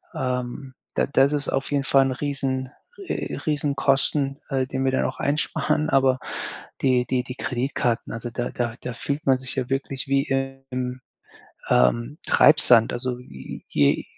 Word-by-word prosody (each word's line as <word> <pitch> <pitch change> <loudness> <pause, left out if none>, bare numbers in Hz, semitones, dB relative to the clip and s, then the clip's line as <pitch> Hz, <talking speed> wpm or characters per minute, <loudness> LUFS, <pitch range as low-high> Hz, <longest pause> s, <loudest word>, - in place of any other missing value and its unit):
Ähm, 125 +1 -3 0.2
da - - +2
das 140 +1 +3
ist 145 -1 -1
auf 135 - -1
jeden 140 -1 +1
Fall 135 -1 +5
'n - - -1
Riesen 135 -3 -2 0.4
äh, - - -3
Riesenkosten, 140 -1 +1
äh, 135 -2 +1
den 130 0 -2
wir 130 - +3
dann 130 - +1
auch - - -4
einsparen, 150 +1 0
aber 135 -1 +4 0.6
die 125 -2 +3
die 130 -1 0
die 125 0 -7
Kreditkarten, 125 -2 -1
also, 115 +1 -5
da 120 +1 -3
da 120 -2 -2
da 125 - -4
fühlt 145 +5 -3
man 130 -1 +5
sich 130 -2 -4
ja 130 -1 -2
wirklich 135 0 -2
wie 135 0 +2 0.5
im, 125 0 -3 0.7
ähm, 120 - +2
Treibsand, 125 -7 +6
also, 125 0 -2
j 65 - -10
je 70 -1 +2
130 Hz, 160 wpm, -24 LUFS, 125-140 Hz, 0.7 s, Treibsand